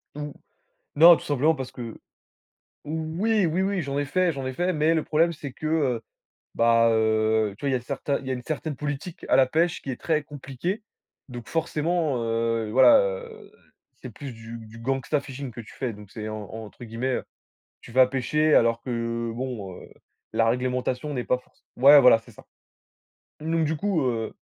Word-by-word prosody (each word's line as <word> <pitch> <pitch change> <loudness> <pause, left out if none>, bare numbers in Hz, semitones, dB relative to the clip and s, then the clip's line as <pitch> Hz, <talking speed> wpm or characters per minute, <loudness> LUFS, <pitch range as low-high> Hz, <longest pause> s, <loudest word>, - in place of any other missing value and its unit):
Mmh. 150 0 -5 0.6
Non, 170 +3 +9
tout - - -11
simplement 145 +3 +2
parce 130 -3 -6
que 115 -3 -8 0.9
oui, 165 +7 0
oui, 170 +3 0
oui, 195 -1 0
j'en 140 -2 -3
ai 145 - 0
fait 180 +5 +1
j'en 135 -2 -5
ai 130 - -3
fait, 180 +6 0
mais 155 +1 +2
le 160 -2 0
problème, 165 +2 +2
c'est 145 -3 -7
que, 155 - -9
heu, 140 -7 +1 0.5
bah, 115 0 +4
heu, 110 -1 +2
tu - - -10
vois, - - +2
il - - 0
y - - +2
a - - -3
certains 140 +3 -2
il 135 - -12
y - - -3
a - - +1
une 125 - -6
certaine 155 +1 -4
politique 150 +4 -5
à - - +4
la 135 - +5
pêche 165 +5 0
qui 135 - -5
est 125 - -6
très 155 -2 0
compliquée, 145 - -5 0.5
donc 120 -2 -9
forcément, 160 -4 0
heu, 115 -1 -1
voilà, 130 +4 +7
heu, 480 -4 -5 0.4
c'est - - -10
plus 140 -4 -8
du 115 0 -9
du 110 0 -12
gangsta 135 +4 -1
fishing 135 -1 -7
que 120 - -8
tu 110 - -13
fais, 125 -4 -3
donc 105 -1 -13
c'est, 110 0 -6
en 110 -1 -5
entre 110 +2 -9
guillemets, 120 +3 -2
heu, - - -5 0.6
tu - - -13
vas 130 +1 +6
pêcher 150 +4 +1
alors 115 0 +3
que, 115 -1 -3
bon, 115 -6 -5
heu, - - -13 0.4
la 115 0 +3
réglementation 125 +3 -1
n'est 125 -3 -2
pas 125 - +2
forc 125 - -23 0.2
ouais, 140 +3 +9
voilà, 125 -3 +7
c'est 115 - -17
ça, - - -16 1.0
donc 160 +1 0
du 155 +1 -1
coup, 195 -2 0
heu. 115 -3 -2
135 Hz, 200 wpm, -25 LUFS, 115-155 Hz, 1.0 s, Non